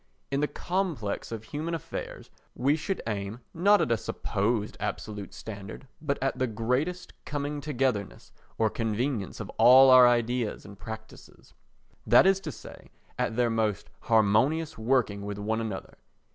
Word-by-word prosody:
In 140 - +1
the 150 - +1
complex 170 - -3
of 110 -2 -5
human 155 +8 -4
affairs 165 - -7 0.2
we 140 +4 +2
should 160 +5 -3
aim 105 +1 -4
not 200 +5 +4
at - - 0
a 115 - +3
supposed 110 0 -2
absolute 105 -2 -5
standard 105 +4 -9
but 140 -2 -1
at 135 -1 -1
the 130 - +1
greatest 125 +11 -2
coming 145 0 -3
together 130 -7 0
ness - - -16 0.3
or 110 -1 +2
convenience 115 -1 -2
of - - -6
all 130 +2 +8
our 130 -1 +9
ideas 120 -1 0
and 100 -1 -12
practices; 110 0 -11 0.5
that 120 +10 +7
is 195 0 +4
to 165 -5 -6
say, - - -12 0.3
at - - 0
their 120 -1 +2
most 110 -3 -1
harmonious 115 +9 +2
working 110 -3 +1
with 100 0 -5
one 110 +2 -1
another. 110 -4 -6
120 Hz, 155 wpm, -28 LUFS, 110-145 Hz, 0.5 s, our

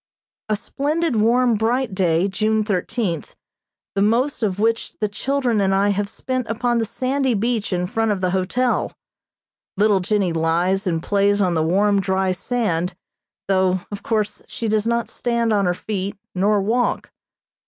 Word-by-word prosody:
A 215 - +2
splendid 290 +7 -1
warm, 240 +3 +3
bright 230 +2 0
day, 180 -1 +2
June 215 +2 +1
thirteenth, 195 - -2 0.6
the 195 - 0
most 245 +8 +1
of 195 -4 0
which 225 +2 0
the 210 - 0
children 245 +1 0
and 195 0 +2
I 200 +1 +3
have 200 0 -1
spent 255 +2 -3
upon 240 +1 0
the 225 - 0
sandy 260 +1 0
beach 225 0 -1
in 180 -1 0
front 225 +3 0
of 205 -2 0
the 185 -1 0
hotel. 205 +7 0 0.8
Little 205 -1 +4
Jennie 190 -2 0
lies 175 +5 +1
and 165 -2 -1
plays 200 0 +2
on 185 -3 +2
the 160 - +1
warm, 200 +5 +2
dry 190 -1 0
sand, 180 -3 -1 0.5
though, 185 -1 +2
of 205 - -5
course, 215 -2 -1
she 230 - -4
does 215 0 +1
not 235 0 0
stand 235 -2 0
on 200 -2 +2
her 175 - +1
feet 200 0 -4 0.2
nor 200 +2 +2
walk. 240 +4 0
205 Hz, 165 wpm, -21 LUFS, 190-235 Hz, 0.8 s, Little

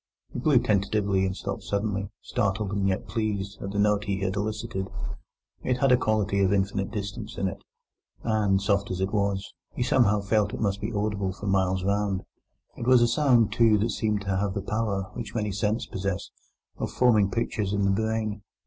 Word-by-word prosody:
He - - -3
blew 140 +1 +4
tentatively 100 -3 +2
and 95 - -4
stopped - - -4
suddenly, 100 -1 -2
startled 105 -3 -1
and 100 -1 0
yet 95 -1 -1
pleased 100 -3 -2
at 100 - -4
the 100 - -4
note 105 0 +2
he 100 -1 -2
had 95 0 -1
elicited. 105 -2 -3 0.7
It 125 -1 0
had 135 0 +3
a - - +8
quality 110 -4 +1
of 95 -1 +3
infinite 95 0 0
distance 105 +1 -5
in 95 - 0
it, 95 - -5 0.6
and, 105 -3 +2
soft 100 0 +1
as 95 - -3
it 95 +1 -1
was, 100 -1 0 0.2
he - - 0
somehow 120 -4 +3
felt 105 0 +1
it - - -7
must 100 -2 0
be 105 - -2
audible 100 -3 -1
for 100 - -9
miles 95 -1 +1
round. 100 -1 0 0.5
It 120 - -5
was 125 -2 +6
a - - +4
sound, 120 -3 +3
too, 115 -2 +5
that 110 +3 0
seemed 105 -2 0
to 100 -1 -1
have 100 0 -1
the 100 - -2
power 105 -2 -2
(which 115 -2 -6
many 105 -2 0
scents 105 +4 0
possess) 95 0 -3 0.5
of - - -2
forming 110 -6 +4
pictures 105 -3 -1
in 100 -1 +1
the 100 - +3
brain. 110 0 -1
100 Hz, 195 wpm, -27 LUFS, 100-110 Hz, 0.7 s, a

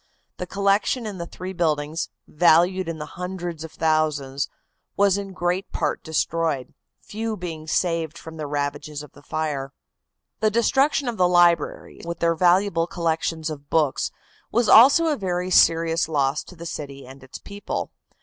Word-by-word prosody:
The 180 - -5
collections 200 +5 +1
in 200 -4 -6
the 170 - -5
three 185 +2 -7
buildings, 155 -2 -1 0.2
valued 175 +3 +3
in 165 - -4
the 150 - -5
hundreds 175 -2 -6
of 160 - -8
thousands, 150 -4 0 0.5
in 200 0 +2
great 180 +1 -2
part - - -1
were - - -48
destroyed, 160 -3 -1 0.3
few 220 +1 -4
being 165 -4 -6
saved 165 -1 0
from 160 -1 -10
the 150 -2 -4
ravages 145 +1 -3
of 150 - -13
the 145 - -17
fire. 145 -3 -3 0.7
The 215 - +3
destruction 270 +6 +2
of 235 -2 -2
the 180 - +4
libraries, 175 -1 +2
with 170 0 -5
their 170 0 +2
valuable 175 0 +3
collections 165 -2 -2
of 145 -1 -9
books, 150 -4 +1 0.4
was 235 0 +2
also 275 +8 +8
a 310 -2 +2
very 185 -4 -2
serious 165 -1 +4
loss 140 -1 0
to 180 - -13
the 170 0 -9
city 140 -4 -7
and 135 +1 -13
its 130 - -9
people. 200 0 -5
170 Hz, 160 wpm, -23 LUFS, 155-185 Hz, 0.7 s, also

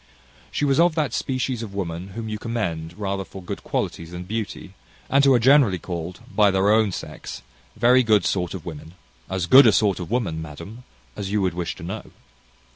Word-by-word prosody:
She 145 - -1
was 140 +1 +2
of 170 -1 +4
that 155 -3 0
species 130 -2 -2
of 105 -4 -7
women 90 0 -4
whom 115 -1 -4
you 105 -1 -4
commend 85 -9 -3
rather 100 -2 -2
for 95 - -11
good 90 - -7
qualities 85 -1 -3
than 90 +1 -7
beauty, 100 -1 -5 0.4
and 140 +1 +5
who 140 - +6
are - - +4
generally 125 -5 +5
called, 90 +3 -6
by 105 -2 +5
their 95 +1 +3
own 110 -2 +3
sex, - - -7 0.3
very 125 +3 +5
good 110 -6 +3
sort 90 -1 -1
of 90 - -8
women 80 +1 -9 0.3
as 95 -1 -1
good 130 +9 +8
a - - +7
sort 100 -2 +2
of 90 - -6
woman, 100 -10 -1
madam, 85 +11 -9 0.3
as 100 -1 -5
you 105 - +1
would 95 - 0
wish 85 -1 -3
to - - -11
know. 100 +6 -5
100 Hz, 200 wpm, -23 LUFS, 90-115 Hz, 0.4 s, good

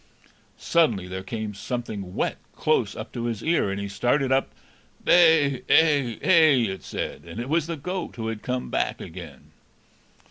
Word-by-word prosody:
Suddenly 115 - +1
there 95 +1 -5
came 110 +2 -5
something 100 -3 -5
wet - - -1 0.2
close - - +1
up - - -7
to 120 -1 -4
his 115 -2 -3
ear, 160 -10 +2
and 95 +1 -3
he 100 - -4
started 125 +7 0
up. 135 0 +2 0.6
"Bay 160 -7 +5
ay 145 -8 +4
ay!" 155 - +5
it 95 - -7
said; - - -5
and 85 +6 -8
it 120 - -4
was 160 0 +1
the 165 -1 -4
goat, 180 +4 -5
who 115 - -5
had 110 -1 -4
come 125 0 -3
back - - -1
again. - - -10
125 Hz, 170 wpm, -25 LUFS, 105-155 Hz, 0.6 s, Bay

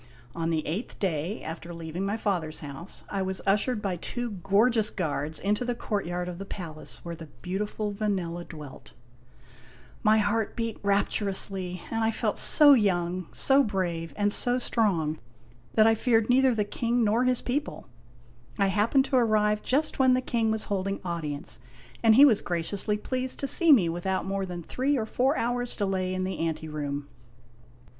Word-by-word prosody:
On 165 0 -1
the 160 -2 -1
eighth 190 +10 -4
day 180 +1 -2
after 165 +2 -7
leaving 165 +2 -5
my 200 +2 -1
father's 175 -8 -2
house, 145 +5 -6
I 195 - -3
was 190 0 -2
ushered 210 +3 +1
by 190 -3 -1
two 240 +7 -4
gorgeous 210 +4 +2
guards 155 -4 -3
into 210 +5 0
the 245 0 -2
courtyard 180 -6 -3
of 180 0 -6
the - - -4
palace 165 -6 -6
where 170 0 -5
the 165 -1 -10 0.2
beautiful 205 +3 -3
Vanella 185 -5 -2
dwelt. 150 -4 -11 1.1
My 215 0 +4
heart 215 +1 0
beat 230 -2 -3
rapturously, 195 -2 0
and 225 -1 0
I 225 - +3
felt 225 - -1
so 295 -2 +7
Il6 - - +6
IMAGINOTIONS 220 - +2
young, 180 -2 0
so 275 +1 +4
brave, 175 -6 -2
and 205 0 +2
so 245 0 +3
strong 180 -11 +1 0.6
that 215 - +6
I 225 - +6
feared 225 0 +2
neither 260 -1 +4
the 210 -2 0
King 235 +3 0
nor 220 +3 +2
his 255 -1 +1
people. 280 - -3 0.7
I 195 -1 +2
happened 220 +7 +2
to 265 - +1
arrive 210 -3 +2
just 295 +4 +1
when 260 -1 +5
the 255 - +1
King 230 -3 0
was 220 0 0
holding 195 -1 -2
audience, 155 -4 -3 0.4
and 225 -1 +5
he 275 +4 +9
was 230 -8 +4
graciously 190 +5 -1
pleased 255 +4 -3
to - - -1
see 325 +5 +5
me 215 -12 +6
without 175 +3 -2
more 195 0 -2
than 175 -1 -6
three 270 - 0
or 220 - -1
four 260 +6 +1
hours' 245 +1 -1
delay 190 -2 -1
in 185 - -2
the 185 0 -3
anteroom. 150 -3 -3
200 Hz, 175 wpm, -27 LUFS, 175-230 Hz, 1.1 s, he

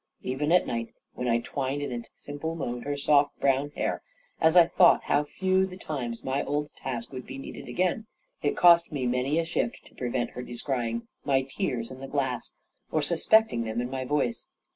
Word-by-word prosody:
Even 140 +5 -1
at 180 - +5
night, 115 -1 -4 0.2
when 125 - -3
I 115 0 +2
twined 140 +2 -2
in 145 - -3
its 120 -1 -5
simple 145 +3 -5
mode 120 -6 -4
her 145 0 -2
soft 145 0 +3
brown 140 +1 +2
hair, - - -2 0.4
as 160 +2 +4
I 175 - +9
thought 175 +1 +5
how 145 - +2
few 185 +5 +1
the 185 -1 -9
times 125 -10 -4
my 135 +2 0
old 150 +1 -2
task 120 -3 -5
would 130 -1 -7
be 135 - -7
needed 135 - -8
again, 185 - 0 0.3
it 145 - 0
cost 170 -1 +6
me 140 -4 -2
many 125 +5 +1
a 165 - +1
shift 175 +7 -2
to - - -18
prevent 125 -1 -2
her 125 - -6
descrying 120 -2 -3 0.2
my 135 -2 +2
tears 125 -2 -3
in 130 - -9
the 135 - -7
glass, 130 -4 -2 0.4
or 155 - +1
suspecting 170 - +3
them 110 +1 -3
in 125 +1 -3
my 130 -1 -2
voice. 130 -3 -1
135 Hz, 200 wpm, -28 LUFS, 125-155 Hz, 0.4 s, I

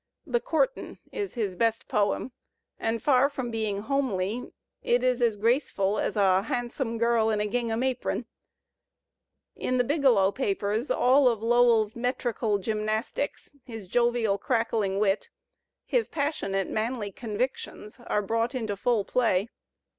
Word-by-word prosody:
"The 245 -6 +1
Courtin'" - - -1
is 405 -7 -4
his 210 -6 -1
best 225 +2 0
poem, 205 +5 0 0.5
and 225 0 -1
far 275 -1 +4
from 260 -4 -4
being 215 -3 -2
"homely," 240 -3 -1 0.3
it 245 +1 +1
is 250 -1 +1
as 230 -3 +3
graceful 210 -3 +1
as - - -1
a 190 -2 +4
"hahnsome" 240 +2 -3
girl 230 -1 +2
in 215 -1 +1
a 210 - 0
gingham 230 +2 -1
apron. 255 -2 -1 1.3
In 255 - -1
"The 250 - +3
Biglow 245 -9 +3
Papers" 210 +1 -1
all 265 +3 +4
Lowell's 230 -1 +3
metrical 235 -3 -1
gymnastics, 215 +6 -3
his 225 -5 -8
jovial, 235 -2 +1
crackling 225 -5 0
wit, 200 -1 +1 0.6
his 485 -2 +1
passionate, 280 - -1
manly 220 -2 -2
convictions 220 0 -4
are 210 - +1
brought 230 +5 -1
into 220 -5 -2
full 215 0 +1
play. 220 -4 +1
230 Hz, 130 wpm, -27 LUFS, 210-250 Hz, 1.3 s, far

